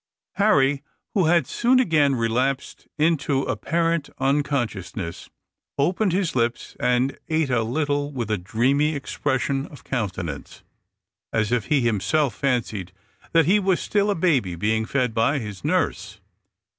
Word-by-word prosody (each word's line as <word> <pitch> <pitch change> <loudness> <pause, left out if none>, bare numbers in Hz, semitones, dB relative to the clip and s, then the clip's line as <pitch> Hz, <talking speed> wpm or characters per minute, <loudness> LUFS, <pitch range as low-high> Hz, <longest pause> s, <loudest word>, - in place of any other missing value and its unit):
Harry, 140 -9 +3 0.3
who 190 -4 +2
had 170 -3 +4
soon 250 - +2
again 155 - +3
relapsed 125 +4 -1
into 150 -3 +1
apparent 165 -1 -1
unconsciousness, 120 - -2 0.5
opened 180 +7 +1
his 180 -4 0
lips 120 -1 -1
and 125 +2 +1
ate 155 -4 +1
a 120 -2 +2
little 145 +4 -1
with 120 -6 -4
a 105 - +1
dreamy 135 - +1
expression 135 0 -1
of 140 -5 -14
countenance, 95 - -4 0.7
as 110 -1 0
if 120 -3 +1
he 145 -3 +2
himself 120 +5 +1
fancied 110 -9 -2 0.4
that 165 -2 +5
he 200 +5 +4
was 190 -2 +1
still 205 0 0
a 205 - +1
baby 135 - +1
being 110 +5 0
fed 125 -4 0
by 115 +6 +2
his 105 -7 -6
nurse. - - -1
135 Hz, 135 wpm, -23 LUFS, 115-155 Hz, 0.7 s, that